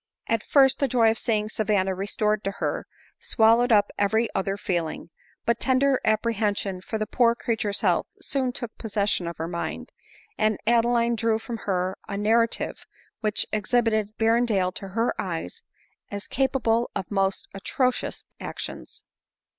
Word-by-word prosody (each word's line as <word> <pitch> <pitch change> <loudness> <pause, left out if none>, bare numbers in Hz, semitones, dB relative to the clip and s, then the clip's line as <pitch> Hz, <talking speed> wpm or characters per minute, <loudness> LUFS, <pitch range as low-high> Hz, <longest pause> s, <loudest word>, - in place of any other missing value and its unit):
At 225 -2 0
first 270 +1 +4
the 275 - +2
joy 230 -3 +4
of 225 - -3
seeing 215 -2 0
Savanna 205 -3 0
restored 205 +2 -1
to 195 - 0
her, - - -3 0.3
swallowed 230 +2 +3
up 205 -2 +4
every 220 +3 +1
other 195 +1 -1
feeling; 170 -4 -3 0.3
but 235 0 +1
tender 265 0 +3
apprehen 215 -1 +1
sion 190 -2 -3
for 220 +4 -4
the 215 - -1
poor 235 +1 +3
creature's 220 -4 -1
health - - +2
soon 260 -2 -1
took 240 -2 -6
possession 205 -5 0
of 170 - -5
her 165 - -3
mind, 170 0 -4 0.5
and 215 -1 +2
Adeline 235 0 +3
drew 225 0 +1
from 230 +1 -6
her 185 0 0
a 200 - -4
narrative, 225 +3 +1 0.4
which 215 -2 0
exhibited 215 -1 +1
Berrendale 225 -5 +2
to 195 - -7
her 225 +5 0
eyes 165 - -5 0.5
as 200 0 -5
capable 240 -3 +1
of 190 - -4
most 195 -1 0
atrocious 250 +6 -1
actions. - - -7
215 Hz, 150 wpm, -25 LUFS, 200-235 Hz, 0.5 s, first